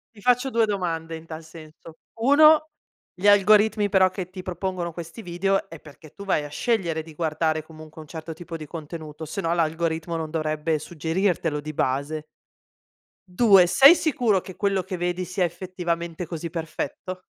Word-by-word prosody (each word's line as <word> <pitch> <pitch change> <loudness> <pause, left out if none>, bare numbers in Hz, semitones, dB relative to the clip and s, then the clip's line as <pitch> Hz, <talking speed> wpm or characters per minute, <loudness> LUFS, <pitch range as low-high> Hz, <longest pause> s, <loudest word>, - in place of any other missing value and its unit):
Ti 205 - -15
faccio 250 +3 +2
2 225 -1 +2
domande 165 -5 -2
in 160 - -10
tal 160 0 -8
senso: 160 0 -13 0.2
1 305 +4 +6 0.5
gli 185 +3 0
algoritmi 205 +1 +5
però 190 -1 +4
che 185 -2 -6
ti 185 0 -9
propongono 180 -1 -3
questi 170 +6 -8
video 195 +3 0
è 165 - -11
perché 150 +1 -15
tu 200 - -10
vai 185 -6 0
a 145 - -7
scegliere 170 -5 -1
di 155 -1 -13
guardare 155 -1 -1
comunque 155 0 -13
un 155 - -10
certo 160 +1 -7
tipo 170 +1 -9
di 155 -2 -7
contenuto, 160 -1 -8
se 175 +6 -4
no 165 -1 -1
l'algoritmo 165 0 -1
non 160 -1 -3
dovrebbe 155 0 -1
suggerirtelo 165 0 -1
di 155 +1 -7
base. 145 +4 -1 1.0
2: 190 -1 +5
sei 275 - +8
sicuro 240 - +1
che 185 - -10
quello 200 -2 0
che 185 - -5
vedi 175 +1 -2
sia 180 0 0
effettivamente 170 -1 -4
così 170 0 -5
perfetto? 165 +2 -5
170 Hz, 170 wpm, -24 LUFS, 160-195 Hz, 1.0 s, sei